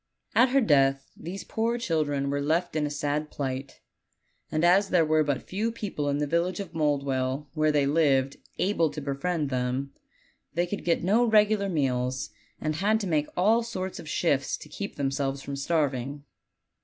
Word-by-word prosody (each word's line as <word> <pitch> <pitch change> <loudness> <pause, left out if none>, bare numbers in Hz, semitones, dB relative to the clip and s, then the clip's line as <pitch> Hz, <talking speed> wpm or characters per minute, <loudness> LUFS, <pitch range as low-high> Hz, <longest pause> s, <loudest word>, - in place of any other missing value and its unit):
At 250 +3 +5
her 275 +2 +3
death 135 - +3
these 185 +4 -7
poor 230 +2 -1
children 150 -9 0
were 145 0 -1
left 160 +4 0
in 150 -1 +1
a - - -4
sad 145 +1 -2
plight; 135 -1 -5 0.7
and 155 +2 +1
as 190 +3 +4
there 170 -3 +4
were 155 0 +3
but 145 -3 -1
few 215 +5 -2
people 195 -10 -3
in 140 - 0
the 150 - 0
village 170 +4 0
of 190 -4 -6
Mouldwell, 140 -2 0
where 155 -1 +2
they 145 -2 +2
lived, 140 -3 +2 0.2
able 180 -4 +2
to 150 +1 -6
befriend 145 +2 -2
them, 130 +2 -2 0.6
they 175 +1 +2
could 200 +3 -5
get 170 -1 +1
no 215 +7 +4
regular 210 -2 +3
meals, 125 - -1 0.3
and 155 0 -2
had 210 +5 +2
to - - -2
make 155 -4 +1
all 215 +6 +4
sorts 190 -5 -5
of 155 - -9
shifts 140 -5 +1
to 150 - -12
keep 200 +7 -6
themselves 135 -1 -2
from 140 - -5
starving. 140 -2 -1
155 Hz, 180 wpm, -27 LUFS, 140-185 Hz, 0.7 s, At